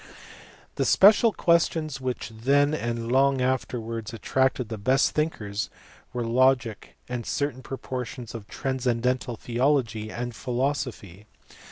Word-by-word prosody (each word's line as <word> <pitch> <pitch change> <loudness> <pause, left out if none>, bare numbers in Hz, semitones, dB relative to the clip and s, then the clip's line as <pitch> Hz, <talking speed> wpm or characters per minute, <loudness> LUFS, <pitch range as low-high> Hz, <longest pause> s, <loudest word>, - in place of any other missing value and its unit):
The - - +1
special 215 +3 +6
questions 160 -6 +1
which 125 -3 -3
then 140 +6 +2
and 115 -4 -2
long 135 +1 +4
afterwards 115 -3 -2
attracted 130 +2 0
the 110 -2 -5
best 130 +6 +3
thinkers 110 -10 -2 0.4
were 120 -1 -3
logic 120 -2 +1
and 125 -1 -4
certain 140 +1 -2
portions 125 -2 -6
of 110 -3 -8
transcendental 125 -1 -1
theology 120 -3 0
and 120 0 -5
philosophy. 125 - -3
125 Hz, 115 wpm, -26 LUFS, 115-135 Hz, 0.4 s, special